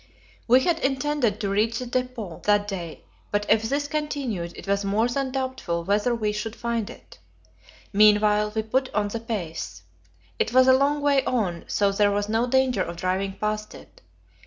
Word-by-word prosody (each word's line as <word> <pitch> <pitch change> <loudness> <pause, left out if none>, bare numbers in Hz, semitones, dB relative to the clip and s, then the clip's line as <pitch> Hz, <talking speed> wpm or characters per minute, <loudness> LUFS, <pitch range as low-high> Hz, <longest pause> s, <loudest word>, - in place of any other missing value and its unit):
We 250 +2 +6
had 335 +3 +1
intended 270 -6 0
to 200 - -1
reach 215 +3 +1
the 250 - -4
depot 245 -7 -4
that 205 0 +3
day, 175 -5 -6 0.3
but 205 0 0
if 215 0 +4
this 285 +1 -1
continued, 280 - -3
it - - -10
was 200 0 +1
more 205 +4 +1
than 265 +2 -2
doubtful 260 -11 -3
whether 205 +6 +1
we 215 -2 -1
should 210 +2 -4
find 235 -2 -2
it. - - -14 0.7
Meanwhile 210 0 +4
we 220 - 0
put 260 +4 -1
on 205 -1 +1
the 230 - -4
pace. 165 - -5 0.6
It 225 - 0
was 255 0 +6
a 260 - +8
long 285 +2 +2
way 280 -2 +3
on, 190 -9 -1
so 200 -1 +1
there 205 +1 +3
was 205 0 -1
no 225 +3 +1
danger 260 0 +2
of 170 - -3
driving 190 +2 -1
past 215 +1 -3
it. - - -16
220 Hz, 185 wpm, -25 LUFS, 205-255 Hz, 0.7 s, a